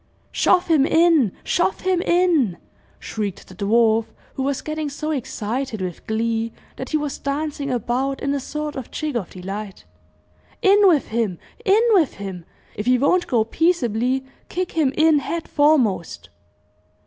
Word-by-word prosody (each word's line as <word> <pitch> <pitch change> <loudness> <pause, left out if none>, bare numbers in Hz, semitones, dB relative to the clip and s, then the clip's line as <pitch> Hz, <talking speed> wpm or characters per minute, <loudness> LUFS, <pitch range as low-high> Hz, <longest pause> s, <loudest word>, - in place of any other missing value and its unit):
"I - - -38
Shove 360 0 +3
him 315 -5 +4
in! 320 - +4
shove 355 +2 0
him 370 -2 +1
in!" 340 - +2 0.4
shrieked 205 -4 -5
the - - -13
dwarf, 220 +3 +2 0.3
who - - -4
was 270 0 -1
getting 310 -1 -3
so 305 +2 -4
excited 255 -3 -3
with 180 -3 -6
glee 225 +1 -1 0.2
that 260 - -6
he 310 - +1
was 295 -2 -4
dancing 285 0 -3
about 255 +3 -1
in 280 0 -1
a 285 - -1
sort 300 +2 -5
of 260 -3 -6
jig 305 -4 -4
of 210 -7 -2
delight. 195 +2 -7 0.8
"In 400 +1 +6
with 320 -6 +3
him 220 -6 -1 0.3
in 425 +1 +4
with 355 -9 +3
him! 190 -4 -7 0.3
If 210 +3 -5
he 250 0 +5
won't 320 +8 +2
go 230 -3 +2
peaceably, 255 -3 0 0.2
kick 365 0 -3
him 310 -5 +1
in 315 -1 +5
head 330 +4 -4
foremost!" 225 - +1
270 Hz, 160 wpm, -22 LUFS, 220-315 Hz, 0.8 s, In